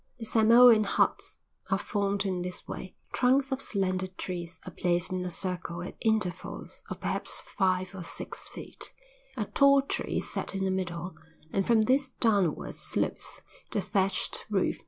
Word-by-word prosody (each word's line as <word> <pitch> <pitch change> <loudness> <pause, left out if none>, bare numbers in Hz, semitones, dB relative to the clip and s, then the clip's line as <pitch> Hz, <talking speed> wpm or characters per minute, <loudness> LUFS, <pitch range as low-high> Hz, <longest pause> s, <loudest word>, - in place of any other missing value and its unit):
The 225 - -6
Samoan 230 0 +7
huts - - +1 0.3
are - - +3
formed 200 -1 -1
in 185 -2 -1
this 180 0 -5
way: 185 - -7 0.2
Trunks 265 +2 +3
of 265 0 -1
slender 185 -4 0
trees 180 -2 -6
are 185 - -7
placed 175 +1 0
in 185 -1 -1
a 180 - -3
circle 175 -1 -3
at 180 - -7
intervals 215 -6 -1
of - - -5
perhaps - - 0 0.2
five 185 -2 +1
or 190 - -7
six 170 - -4
feet; - - -9 0.4
a 215 - 0
tall 280 +4 +5
tree - - -2
is - - -1
set - - -3
in 195 0 0
the 190 - +1
middle 180 -1 -3 0.4
and 195 -1 +1
from 230 -2 +5
this 260 +4 +2
downwards 200 -8 +1
slopes - - -2 0.3
the - - +1
thatched 195 -1 0
roof. 195 -3 +1
190 Hz, 165 wpm, -29 LUFS, 180-220 Hz, 0.4 s, Samoan